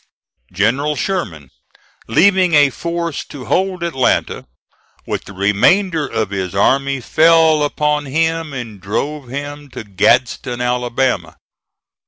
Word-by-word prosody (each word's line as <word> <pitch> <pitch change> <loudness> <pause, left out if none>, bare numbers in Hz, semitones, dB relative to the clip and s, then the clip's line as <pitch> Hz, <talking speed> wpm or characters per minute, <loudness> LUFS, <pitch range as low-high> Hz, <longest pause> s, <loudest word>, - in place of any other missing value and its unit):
General 130 +11 0
Sherman, 90 - -4 0.6
leaving 185 - +3
a 145 -2 +5
force 170 +1 -4
to 135 -4 -10
hold 185 -1 -1
Atlanta, 155 -7 0 0.6
with - - -4
the - - -11
remainder 150 - +2
of 110 -5 -2
his 95 -1 -4
army 135 +6 +2
fell 160 +3 +4
upon 150 0 0
him 160 +2 -1
and 115 -7 -7
drove 135 +8 -3
him 145 +2 -7
to 125 -3 -8
Gadsden, 120 +4 +1
Alabama. 125 +1 -1
140 Hz, 115 wpm, -17 LUFS, 120-160 Hz, 0.6 s, a